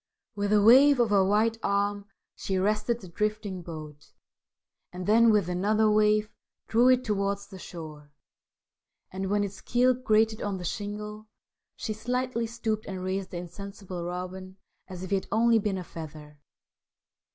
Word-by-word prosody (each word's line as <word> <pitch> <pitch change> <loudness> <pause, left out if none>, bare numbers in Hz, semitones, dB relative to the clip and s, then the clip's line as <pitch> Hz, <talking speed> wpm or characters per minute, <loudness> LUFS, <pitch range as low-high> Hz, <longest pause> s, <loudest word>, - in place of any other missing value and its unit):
With 205 0 -2
a 210 -1 +4
wave 265 +5 +7
of 235 -3 +2
her 200 -2 +5
white 215 +3 +2
arm 200 0 0 0.3
she 195 - -4
arrested 215 +4 0
the 185 - -10
drifting 210 0 -2
boat, 155 -3 -10 0.8
and 180 0 -6
then, 230 +3 +5
with 210 -5 +3
another 210 +4 +2
wave, 210 0 +3 0.4
drew 240 +3 +4
it 255 0 +4
towards 200 -2 -1
the 190 -2 -12
shore, 155 -5 -10 1.0
and, 190 +1 -4
when 205 0 +2
its 195 -1 -6
keel 250 +1 +3
grated 220 -3 +1
on 200 -2 -2
the 180 - -7
shingle, 210 +3 -5 0.5
she 215 - -4
slightly 245 +1 -2
stooped 220 -2 -3
and 185 -2 -5
raised 190 0 -2
the 175 - -6
insensible 185 +1 -7
Robin 185 +2 -6 0.3
as 185 -1 -8
if 185 - -7
he 200 - +3
had 190 - -6
only 230 0 +4
been 200 -2 -1
a 185 - -5
feather. 150 -3 -10
205 Hz, 160 wpm, -27 LUFS, 185-220 Hz, 1.0 s, wave